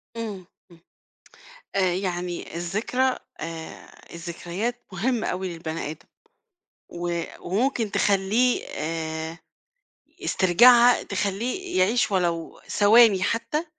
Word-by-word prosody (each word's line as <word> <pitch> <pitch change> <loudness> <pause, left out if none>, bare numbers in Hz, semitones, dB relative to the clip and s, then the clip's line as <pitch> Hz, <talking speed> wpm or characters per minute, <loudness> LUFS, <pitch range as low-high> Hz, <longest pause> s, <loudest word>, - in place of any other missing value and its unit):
امم، 210 -5 -5 0.3
امم. 170 - -17 1.0
آآ 195 - +3
يعني 180 -2 -4
الذكرى 215 +9 0 0.2
آآ، 165 0 -8
الذكريات 175 +8 -5
مُهمّة 225 +5 -1
أوي 185 +1 -2
للبني 165 -2 -5
آدم، 160 - -13 0.8
و 175 -1 -3 0.2
وممكن 225 +3 0
تخلّيه 205 +6 +2
آآ، 160 0 -4 0.9
استرجاعها 240 +7 +6
تخلّيه 215 - -2
يعيش 215 +7 +3
ولو 170 -3 -1
ثواني 210 -2 +5
حتى، 230 - -1
190 Hz, 90 wpm, -25 LUFS, 170-230 Hz, 1.0 s, استرجاعها